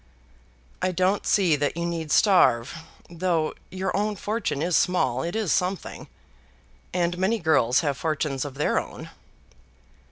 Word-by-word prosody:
"I 185 - +1
don't 185 +3 0
see 185 -7 +3
that 145 +2 -2
you 170 - -2
need 165 -3 -4
starve. 155 - +4 0.3
Though 170 -2 -1 0.2
your 185 0 -3
own 210 +1 0
fortune 205 -6 -2
is 175 0 +1
small, 155 -8 +1
it 170 +7 -4
is 215 -7 0
something, 185 +1 -2 0.8
and 175 0 -1
many 200 +5 +1
girls 145 - +2
have 145 -4 -1
fortunes 150 -4 -2
of 140 -2 -7
their 150 - +1
own." - - -9
170 Hz, 140 wpm, -25 LUFS, 150-185 Hz, 0.8 s, starve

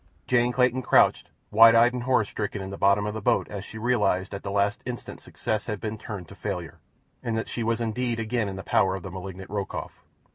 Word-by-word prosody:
Jane 120 -1 +2
Clayton 125 +1 +2
crouched, - - +3 0.2
wide 115 +2 +8
eyed 120 +2 +5
and 125 - -3
horror 125 -2 +3
stricken, 105 0 -4
in 95 0 -6
the - - -5
bottom 100 +1 +3
of 105 - -2
the 110 - -5
boat - - +2
as 100 -2 -6
she 110 - -10
realized 110 -5 +1
that 100 - -3
at - - -13
the - - -5
last 100 +1 +1
instant 125 0 -7
success 110 0 -3
had 105 -3 -3
been 110 +1 -4
turned 100 -7 -7
to - - -11
failure, - - -5 0.4
and 115 -2 -2
that 110 - -2
she 120 - -4
was 115 0 0
indeed 115 +1 -1
again 115 -1 -1
in 95 - -6
the 95 - -7
power 95 0 +2
of 95 - -7
the 95 - -7
malignant 95 +1 -8
Rokoff. 100 -2 -5
110 Hz, 240 wpm, -26 LUFS, 100-120 Hz, 0.4 s, wide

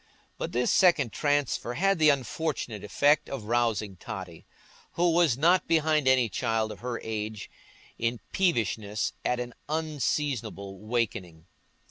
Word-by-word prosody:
But - - -3
this 125 +1 +1
second 165 - +4
transfer 145 -4 0
had 195 0 +2
the 155 -1 +6
unfortunate 135 -5 -2
effect 145 +9 +2
of 135 -5 -5
rousing 110 -4 0
Totty, 90 -2 -8 0.5
who 175 0 +2
was 165 -7 +3
not 175 +6 +3
behind 155 -3 +2
any 130 -2 +4
child 110 +1 -1
of - - -9
her 120 -1 -4
age 110 -1 -5 0.5
in 115 +1 -1
peevishness 110 - 0
at 125 - 0
an 120 0 -5 0.2
unseasonable 145 -8 -2
awaking. 95 -5 -3
120 Hz, 130 wpm, -28 LUFS, 110-150 Hz, 0.5 s, the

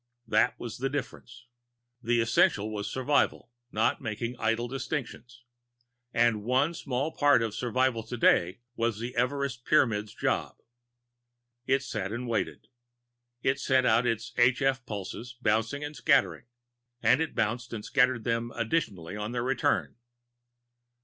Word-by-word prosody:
That 120 +2 +2
was 120 -1 -6
the 135 +1 0
difference. 125 -3 -6 0.6
The 120 0 +2
essential 110 -2 +2
was 105 -1 -3
survival, 130 -2 0 0.2
not 110 +1 +1
making 115 +1 -4
idle 115 +2 0
distinctions. 130 -2 -5 0.7
And 115 -3 +2
one 130 +7 +2
small 140 -1 -2
part 145 -6 +4
of 110 -2 -2
survival 125 +1 0
today 110 -4 +2
was 115 -3 0
the 120 +3 -5
Everest 125 0 -1
Pyramid's 110 -8 +2
job. - - -1 1.1
It 135 0 +2
sat 110 -6 -4
and 120 +2 -4
waited. 115 -2 -2 0.8
It 135 +1 +1
sent 130 -1 +2
out 120 +1 +3
its 115 0 -2
h 125 +3 +4
f 135 -1 +1
pulses 110 +4 -6
bouncing 115 +5 0
and 145 +1 -6
scattering, 95 - +2 0.6
and 130 +5 +4
it 160 - -2
bounced 115 +2 -1
and 110 -2 -6
scattered 130 -4 +2
them 115 0 -1
additionally 110 - -2
on 105 +3 -4
their 120 -1 -1
return. 135 -1 0
120 Hz, 135 wpm, -28 LUFS, 110-130 Hz, 1.1 s, part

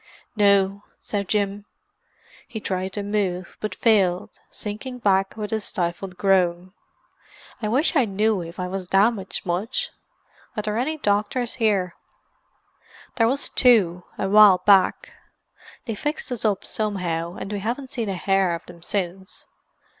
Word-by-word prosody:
"No," 200 -1 +3 0.2
said 200 -2 -4
Jim. 205 0 -1 0.8
He 220 - -6
tried 190 -2 -3
to 205 - -3
move, 195 -3 -2
but 215 - -4
failed, 190 -6 +2 0.2
sinking 220 +5 -6
back 195 -3 +1
with 210 -1 -4
a 220 - +1
stifled 180 -2 -3
groan. 185 -2 +1 0.9
"I 215 - -1
wish 275 +10 +2
I 270 -5 +4
knew 210 0 +1
if 170 +1 -9
I 180 - -2
was 185 0 -5
damaged 195 +1 +1
much. 215 - -2 0.7
Are 210 - -1
there 210 0 -2
any 310 +5 -1
doctors 215 +1 0
here?" 195 -5 +2 1.2
"There 225 -2 +4
was 275 +4 +1
two, 190 -9 +4
a 195 - -1
while 200 -2 +7
back. 195 -3 +4 0.7
They 230 - -3
fixed 295 +5 -3
us 245 - -3
up 205 -3 0
somehow, 180 -5 -2
and 195 - -6
we 205 - -2
haven't 250 +6 -4
seen 230 -6 -2
a 195 - -2
hair 190 -1 +1
of 170 - -10
them 170 -1 -13
since. 190 +1 -4
200 Hz, 145 wpm, -23 LUFS, 185-220 Hz, 1.2 s, while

